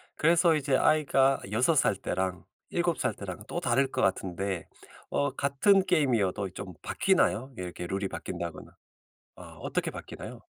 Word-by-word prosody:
그래서 165 +1 +4
이제 140 -2 +1
아이가 135 -2 +3
6 125 +9 +3
살 135 - +3
때랑 95 -2 -3 0.2
7 170 -1 0
살 - - 0
때랑 100 0 -7
또 175 - -3
다를 135 -2 +1
것 - - -1
같은데 95 -1 -1 0.4
어 145 - +1
같은 185 +8 +3
게임이어도 110 - +1
좀 95 -1 -8
바뀌나요? 130 +5 +1
이렇게 90 -1 -5
룰이 95 +2 -2
바뀐다거나. 85 -3 -6 0.7
아 - - -11 0.2
어떻게 - - -2
바뀌나요? - - -9
120 Hz, 295 characters per minute, -29 LUFS, 95-150 Hz, 0.7 s, 그래서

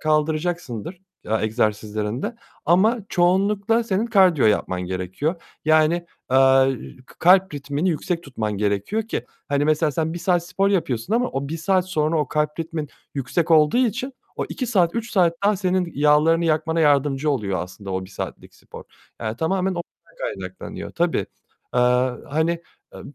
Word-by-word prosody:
kaldıracaksındır, 155 - -1 0.2
ya, 110 0 0
egzersizlerinde 110 - -1 0.3
ama 210 +8 +4
çoğunlukla 200 +5 +2
senin 210 +2 0
kardiyo 185 - +4
yapman 95 -3 +1
gerekiyor. 95 - -2 0.3
Yani, 155 +1 +4 0.4
eee, 135 0 +5 0.3
k - - -18
kalp 185 -1 +5
ritmini 145 +5 -2
yüksek 170 +2 -2
tutman 110 -7 -3
gerekiyor 105 - 0
ki, 220 - -4 0.2
hani, 145 0 +1
mesela 155 0 +2
sen 160 +3 -1
1 175 - -4
saat 175 -1 +1
spor 195 +2 +1
yapıyorsun 165 - -1
ama 245 +1 +2
o 140 +1 -3
1 165 - -3
saat 185 +2 +1
sonra 155 -2 +1
o 150 - 0
kalp 150 +1 -1
ritmin 160 -2 -4 0.3
yüksek 140 +5 -1
olduğu 155 +7 +5
için 255 +4 -3 0.2
o - - -1
2 255 - -3
saat, 185 -7 +2
3 230 0 -3
saat 175 -5 +3
daha 205 0 +3
senin 185 -2 0
yağlarını 150 +4 +4
yakmana 160 +1 +1
yardımcı 145 -1 +2
oluyor 105 -9 -1
aslında 95 +2 -9
o 95 0 -2
1 95 - -14
saatlik - - -7
spor. - - -12 0.4
Yani 110 0 -3
tamamen 190 +6 0
ondan 175 -2 -3 0.3
kaynaklanıyor. 95 -1 -6
Tabii. - - 0 0.5
Eee, 125 - +3 0.5
hani, 165 +3 0 0.3
eee, - - -9
155 Hz, 155 wpm, -22 LUFS, 135-185 Hz, 0.5 s, eee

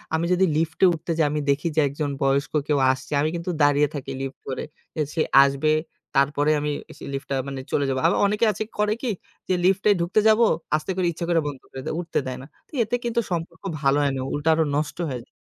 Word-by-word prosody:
আমি 165 +1 0
যদি 185 +1 +4
লিফটে 165 +4 +2
উঠতে 165 +1 -5
যাই, 160 - +3
আমি 150 - -1
দেখি 140 +4 +1
যে - - +3
একজন 145 +1 -3
বয়স্ক 135 +1 +1
কেউ 145 -2 +2
আসছে, 130 0 -6
আমি 155 - +1
কিন্তু 170 +1 -3
দাঁড়িয়ে 145 0 +4
থাকি 135 -1 -5
লিফট 135 0 -5
ধরে। 130 - -3 0.3
যে 155 - -1
সে 160 - 0 0.2
আসবে, 140 +2 +1 0.4
তারপরে 145 +2 +2
আমিসে 145 0 -5
লিফটটা 135 0 -3
মানে 135 -1 -5
চলে 145 - +1
যাবো। 130 0 0
আবার - - +2
অনেকে 210 +3 +1
আছে 210 - -3 0.2
করে 210 0 +2
কি? 250 - -1 0.4
যে - - +3
লিফটে 195 +2 +3
ঢুকতে 170 +5 +2
যাবো, 220 +2 +5 0.3
আস্তে 155 +5 -2
করে 185 -1 +1
ইচ্ছা 170 +1 -5
করে 170 -1 +3
বন্ধ 140 -3 -6
করে 130 - -7
দেয়, - - -2
উঠতে 175 -1 -1
দেয় 130 -1 -4
না। - - -10 0.2
তো - - -34
এতে 225 +3 -1
কিন্তু 235 0 +1
সম্পর্ক 165 -1 -4 0.2
ভালো 135 0 +3
হয় 140 -1 +1
না, - - -2
উল্টা 145 +2 0
আরো 160 0 +2
নষ্ট 150 +1 -2
হয়ে 125 -3 -4
যায়। - - -45
155 Hz, 225 wpm, -24 LUFS, 140-175 Hz, 0.4 s, যাবো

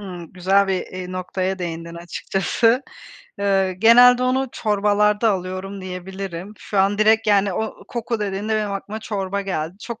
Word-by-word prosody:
Hımm. 180 -4 -9
Güzel 195 +2 +2
bir, 185 -2 -1
eee, 185 0 -7
noktaya 185 +1 -2
değindin 170 -1 -5
açıkçası. 195 +8 0 0.6
Iıı, 195 -2 +2
genelde 245 +5 +6
onu 260 +1 +1
çorbalarda 210 +1 +2
alıyorum, 185 +1 -5
diyebilirim. 185 +1 -7
Şu 200 - -3
an 200 +2 +2
direkt, 220 +1 +4
yani, 200 -1 +3
o 220 +4 -4
koku 235 -1 -3
dediğinde 205 +2 -2
benim 210 -2 -1
aklıma 205 +2 -5
çorba 200 -2 -3
geldi. 185 -2 -4
Çok 235 +1 -7
195 Hz, 150 wpm, -21 LUFS, 185-215 Hz, 0.6 s, genelde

